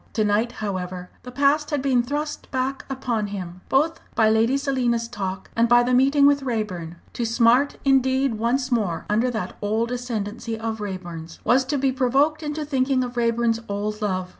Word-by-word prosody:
To 215 - +1
night, 215 +3 +1
however, 185 -3 -5
the 250 - -9
past 285 +3 +2
had 290 -4 -1
been 260 -3 +3
thrust 295 +5 -4
back 265 0 -2
upon 240 -5 -2
him, 185 -3 -7
both 310 +5 +2 0.2
by 220 -1 +4
Lady 225 +5 +3
Selina's 250 -4 0
talk 195 -5 -5
and 230 0 +3
by 240 0 +6
the 250 +1 0
meeting 275 +3 +4
with 285 0 +4
Raeburn. 210 -10 -3 0.2
To 240 - -3
smart 235 +4 +3
indeed 265 -1 +3
once 245 +4 0
more 205 -9 0
under 225 +4 +2
that 220 -6 -4
old 220 +3 0
ascendency 230 -2 -4
of 220 -1 -4
Raeburn's, 175 -5 -6
was 255 +3 +4
to 285 +2 -1
be 270 0 +1
provoked 275 +4 +2
into 300 0 -3
thinking 265 -2 +1
of 245 0 -6
Raeburn's 230 -1 +1
old 210 +1 -3
love. 185 -3 -1
240 Hz, 180 wpm, -23 LUFS, 210-270 Hz, 0.2 s, by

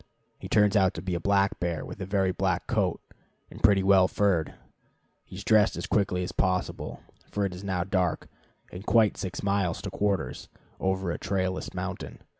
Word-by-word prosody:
He - - -8
turns 105 -2 +4
out 95 -1 +3
to 85 - -5
be 95 -1 -2
a 85 - -1
black 100 -1 +2
bear 85 -2 -2
with - - -9
a 95 - -4
very 95 -1 +1
black - - -1
coat, - - 0 0.5
and - - -11
pretty 100 -2 +5
well 95 -1 +5
furred. 95 -6 +1 0.7
He - - -12
is 100 - -7
dressed 110 -1 +4
as 85 - -3
quickly 95 -3 +1
as 90 - -4
possible, 90 -1 -2 0.3
for 100 -1 -1
it 95 - -3
is 90 +2 -9
now 95 -3 -1
dark, 90 -3 -1 0.4
and 90 +2 -8
quite 110 -1 +4
six 95 +1 -5
miles 100 -4 0
to - - -4
quarters, 100 -2 -2 0.3
over 95 -1 0
a - - -4
trailless 95 -1 -2
mountain. - - -5
95 Hz, 190 wpm, -27 LUFS, 90-100 Hz, 0.7 s, pretty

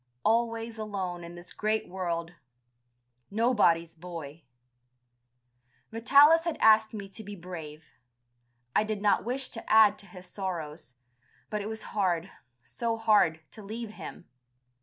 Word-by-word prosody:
Always 230 0 0
alone 190 -5 -4
in 170 +1 -9
this 175 +1 -12
great 215 +1 -1
world! 175 -2 -3 1.0
Nobody's 200 -7 +2
boy! 165 -3 -8 1.5
Vitalis 285 +8 +6
had 335 -3 -1
asked 220 0 +6
me 205 -3 -6
to 220 +3 -9
be 205 0 -8
brave. 165 -4 -9 0.9
I - - +4
did 215 -1 -3
not 205 0 +2
wish 255 +3 -3
to 230 - -8
add 215 -2 +6
to 200 - -13
his 180 0 -11
sorrows, 170 -8 -6 0.6
but 210 -1 -1
it 205 - -4
was 220 0 -6
hard, 185 -3 0 0.3
so 230 -1 -3
hard, 205 -8 +3
to 220 - -11
leave 220 +2 -6
him. 195 - -10
205 Hz, 135 wpm, -29 LUFS, 175-220 Hz, 1.5 s, Vitalis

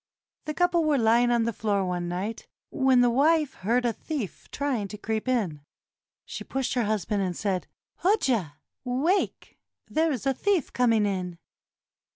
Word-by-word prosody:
The 305 0 -4
couple 355 -1 +2
were 305 -2 +2
lying 235 +1 +4
on 235 -1 +3
the 230 0 -1
floor 200 -2 0
one 175 -1 -2
night 190 +6 -4 0.2
when 265 -3 +4
the 245 - +5
wife 300 +3 +3
heard 235 +6 0
a 235 - +1
thief 260 - -6
trying 260 -8 -2
to 210 - -8
creep 220 +2 -3
in. 200 - 0 0.6
She - - -6
pushed 270 -1 -2
her 245 -3 +1
husband 210 -1 0
and 180 -3 -2
said, 195 -3 -1 0.3
"Hoja, 260 - +1 0.3
wake; 275 +10 -1 0.3
there 320 +1 +1
is 255 -3 -3
a 270 - +3
thief 375 +2 0
coming 230 -4 +3
in." 180 -3 -2
235 Hz, 165 wpm, -27 LUFS, 205-275 Hz, 0.6 s, the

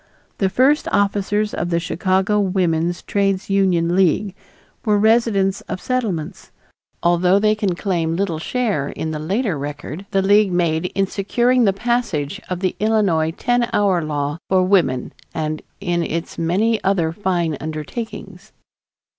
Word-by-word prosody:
The 195 - +2
first 270 +8 +3
officers 205 +1 +1
of 175 - -2
the 170 -1 +1
Chicago 190 +4 +1
Woman's 175 -3 0
Trades 195 -1 0
Union 180 -3 +2
League 190 +2 +2 0.5
were 210 -2 +2
residents 205 -3 +2
of 185 - -3
Settlements, 210 -12 -3 0.5
although 175 +2 +4
they 215 +1 +3
can 205 -4 -1
claim 170 -4 -1
little 175 -4 -1
share 205 - -1
in 160 - -4
the 155 - -4
later 190 - -1
record 145 +6 -6
the 195 0 +1
League 205 0 +4
made 170 -1 +1
in 195 - +2
securing 240 +6 +1
the 195 - +4
passage 200 -6 -2
of 180 -1 -3
the 185 - 0
Illinois 205 -8 +2
Ten 245 +7 0
Hour 190 -5 +2
Law 145 0 -2
for 185 -1 +3
Women 175 -10 +1 0.2
and 155 -1 -2 0.2
in 175 -3 -1
its 165 0 -3
many 200 +7 +1
other 180 -5 +1
fine 175 -3 -1
undertakings. 195 +5 -7
190 Hz, 145 wpm, -20 LUFS, 165-205 Hz, 0.5 s, although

